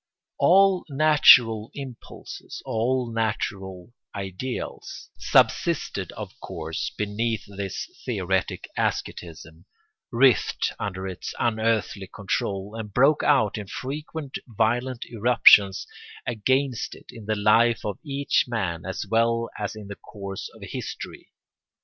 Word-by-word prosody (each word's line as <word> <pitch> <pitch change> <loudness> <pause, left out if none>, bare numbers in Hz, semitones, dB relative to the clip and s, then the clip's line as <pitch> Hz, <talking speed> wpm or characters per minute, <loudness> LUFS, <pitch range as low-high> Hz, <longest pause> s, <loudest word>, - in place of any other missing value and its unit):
All 195 0 +5
natural 130 -7 +6
impulses, 135 -4 -9
all 120 +1 0
natural 100 -3 -3 0.2
ideals, 100 +6 -6
subsisted - - +2
of - - -7
course 80 0 -4
beneath 105 +2 -1
this 100 -1 -5 0.2
theoretic 95 -5 -1
asceticism, 80 0 -4 0.5
writhed 120 -3 +3
under 95 -1 -4
its 95 -2 -6
unearthly 110 -3 0
control, 100 +1 -3
and 110 -2 -6
broke 140 +7 +4
out 110 -8 +3
in 105 - -7
frequent 145 +5 -5
violent 120 +3 0
irruptions 110 -4 +5 0.4
against 130 +2 0
it - - -16
in 110 -3 -11
the 110 - +1
life 115 +3 +3
of 105 -3 -3
each 140 -2 +1
man 95 -9 -2
as 95 - -4
well 115 +2 +1
as 105 +1 -3
in 105 -2 -9
the 100 - -7
course 100 -2 -7
of - - -13
history. - - -7
110 Hz, 115 wpm, -25 LUFS, 100-125 Hz, 0.5 s, natural